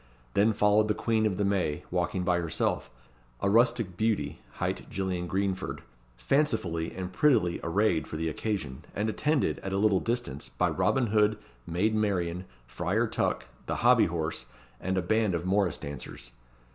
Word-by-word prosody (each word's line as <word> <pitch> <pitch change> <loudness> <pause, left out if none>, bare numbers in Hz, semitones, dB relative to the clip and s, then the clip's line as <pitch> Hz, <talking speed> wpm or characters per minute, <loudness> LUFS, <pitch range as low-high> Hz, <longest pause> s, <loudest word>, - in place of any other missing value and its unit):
Then 110 +2 +4
followed 105 +1 +4
the 105 - +1
Queen 110 -2 +1
of 95 -4 -2
the 100 - +1
May, 95 -7 0
walking 90 +1 0
by 90 -1 +2
herself, 85 -6 -1 0.5
a 100 - +1
rustic 115 -5 +3
beauty, 80 - 0
hight - - -3
Gillian 90 -2 -2
Greenford, 95 +1 -2 0.3
fancifully 95 - 0
and 95 -1 -5
prettily 110 -10 +3
arrayed 90 -1 +1
for 80 - -5
the 80 +1 -1
occasion, 80 -5 -3
and 110 +2 0
attended, 150 +4 +1
at 95 - -5
a - - +1
little 100 -2 +3
distance, 115 - -3
by - - 0
Robin 130 -2 +2
Hood, 105 0 +4 0.3
Maid 95 +6 +1
Marian, 95 -4 0 0.2
Friar 60 - 0
Tuck, - - -1 0.2
the - - -1
Hobby - - +6
horse, 80 -1 -3 0.3
and 95 +1 -1
a 95 - +1
band 110 0 +2
of 85 +1 -3
morrice 95 -3 +2
dancers. 65 -3 -8
95 Hz, 160 wpm, -29 LUFS, 85-110 Hz, 0.5 s, Hobby